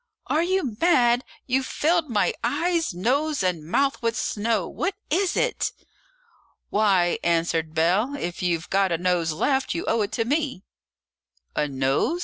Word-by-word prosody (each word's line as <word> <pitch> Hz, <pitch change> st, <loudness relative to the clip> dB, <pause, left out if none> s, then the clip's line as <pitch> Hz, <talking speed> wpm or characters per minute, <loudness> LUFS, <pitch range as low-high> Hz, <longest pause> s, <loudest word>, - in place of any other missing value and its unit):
"Are 310 Hz, -, +1 dB
you 345 Hz, -, -1 dB
mad? 250 Hz, -8 st, +4 dB, 0.2 s
You've 260 Hz, +1 st, 0 dB
filled 325 Hz, -1 st, +1 dB
my 230 Hz, -, +1 dB
eyes, 340 Hz, -4 st, 0 dB
nose, 260 Hz, -, 0 dB
and 180 Hz, -4 st, -1 dB
mouth 275 Hz, -, 0 dB
with 230 Hz, -1 st, 0 dB
snow. 210 Hz, -3 st, -1 dB
What 385 Hz, +1 st, -2 dB, 0.2 s
is 370 Hz, +3 st, +1 dB
it?" -, -, 0 dB, 1.0 s
"Why," 195 Hz, -5 st, +2 dB
answered 165 Hz, -1 st, 0 dB
Bell, 190 Hz, -, +2 dB
"if 175 Hz, +1 st, -4 dB
you've 175 Hz, -2 st, -1 dB
got 195 Hz, -1 st, +2 dB
a 170 Hz, -, +1 dB
nose 175 Hz, -2 st, +1 dB
left, 265 Hz, -, 0 dB
you 345 Hz, -, -3 dB
owe 230 Hz, -, +2 dB
it 205 Hz, 0 st, -2 dB
to 225 Hz, 0 st, 0 dB
me." 280 Hz, -, -1 dB, 0.9 s
"A 150 Hz, -, +1 dB
nose?" 135 Hz, -, 0 dB
225 Hz, 150 wpm, -24 LUFS, -, 1.0 s, mad